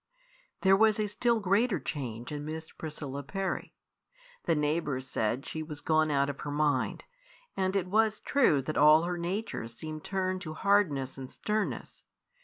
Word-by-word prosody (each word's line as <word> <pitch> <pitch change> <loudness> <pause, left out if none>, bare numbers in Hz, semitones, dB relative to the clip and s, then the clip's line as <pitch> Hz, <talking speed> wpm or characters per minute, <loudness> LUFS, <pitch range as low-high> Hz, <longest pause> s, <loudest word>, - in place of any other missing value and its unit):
There 190 0 +6
was 220 +1 +4
a 215 - +2
still 230 +3 +1
greater 200 0 +2
change 125 -4 -5
in 145 -1 -4
Miss 160 +1 -6
Priscilla 145 -3 -6
Parry. 190 +8 -3 0.7
The 165 - +3
neighbours 150 -3 -1
said 120 +2 -1
she 160 - -4
was 155 -2 -7
gone 155 0 +3
out 140 -1 +2
of 140 -1 -5
her 145 - -5
mind; 145 0 0 0.5
and 190 0 0
it 195 -3 +1
was 215 +3 +2
true 195 - +3
that 155 +4 -3
all 155 +2 +7
her 175 0 -2
nature 180 - -3
seemed 155 +6 -7
turned 185 -1 -1
to 155 -3 -6
hardness 155 -11 +2
and 130 -1 -7
sternness. 215 -1 -3
155 Hz, 165 wpm, -30 LUFS, 145-195 Hz, 0.7 s, all